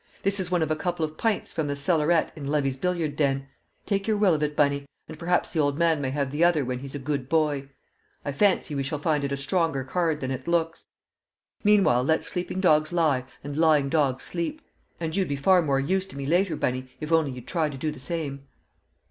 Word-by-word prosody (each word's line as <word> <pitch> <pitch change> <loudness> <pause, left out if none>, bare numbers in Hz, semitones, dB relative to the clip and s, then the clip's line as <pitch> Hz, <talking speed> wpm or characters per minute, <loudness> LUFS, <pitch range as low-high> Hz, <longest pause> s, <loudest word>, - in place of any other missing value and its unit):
"This 195 +1 +3
is 185 -2 0
one 180 -2 +2
of 155 - -2
a - - +2
couple 165 0 -1
of 155 0 -8
pints 220 +4 -1
from 155 -2 -1
the 145 - -2
cellarette 160 +2 +2
in 145 -3 -6
Levy's 140 -2 0
billiard 165 -1 -1
den; 135 -2 0 0.4
take 200 0 -1
your 215 -1 +2
will 200 -4 +4
of 155 - -1
it, 150 0 -1
Bunny, 140 -1 +1 0.2
and 155 - -10
perhaps 175 +1 0
the 165 - 0
old 145 -1 +1
man 165 -3 +2
may 135 - -1
have 140 0 -2
the 150 +4 +1
other 165 -5 +3
when 125 0 -3
he's 135 +1 -7
a - - -1
good 140 -1 -3
boy. 150 -4 +1 0.6
I 145 - -1
fancy 180 0 +2
we 140 - -1
shall 140 +3 -2
find 150 -1 0
it 140 - -2
a 140 - -1
stronger 140 -1 0
card 160 +2 0
than 130 -2 -3
it 130 0 -5
looks. 165 -1 0 0.8
Meanwhile 200 - +4
let 160 +4 +1
sleeping 180 +1 -3
dogs 155 -4 +3
lie 155 -7 +1 0.2
and 145 0 -5
lying 155 -3 +3
dogs 135 -4 +1
sleep! 180 - -3 0.4
And 160 -1 -3
you'd 195 -2 +1
be 140 - -1
far 180 +6 +4
more 140 -4 +1
use 190 +7 0
to 140 - -11
me 140 - -4
later, 175 +3 +2
Bunny, 130 -2 -2
if 155 +1 -5
only 160 -3 +3
you'd 125 -2 -8
try 160 -4 0
to 140 - -7
do 155 +3 -2
the 150 - -9
same." 140 -1 -4
150 Hz, 230 wpm, -26 LUFS, 140-170 Hz, 0.8 s, will